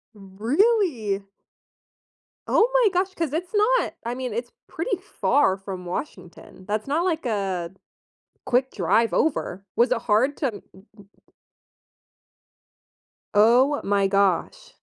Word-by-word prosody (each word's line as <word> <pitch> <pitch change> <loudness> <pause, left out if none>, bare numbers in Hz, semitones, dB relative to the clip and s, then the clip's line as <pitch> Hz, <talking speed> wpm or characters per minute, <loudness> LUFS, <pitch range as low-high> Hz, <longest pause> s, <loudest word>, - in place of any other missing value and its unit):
Really? 225 - 0 1.2
Oh 455 +3 +3
my - - +4
gosh, 375 +1 0
'cause 325 -5 -2
it's 350 +4 -3
not 440 +4 +2
I 240 - -3
mean, 250 -3 -4
it's 240 +1 -4 0.2
pretty 365 +4 -3
far 285 - +1
from 190 -2 -8
Washington, 185 - -8
that's 215 +4 -2
not 320 +6 0
like 325 -5 -1
a 190 -6 -2 0.8
quick 255 +2 +1
drive 225 +5 +1
over, 200 - -1
was 240 +2 +3
it 240 - +2
hard 240 +7 +2
to 280 - 0
n 205 - -8
n 190 +3 -18
n 200 -1 -16 2.3
Oh 245 +7 +4
my 200 -1 +2
gosh. 200 - 0
240 Hz, 125 wpm, -24 LUFS, 200-330 Hz, 2.3 s, my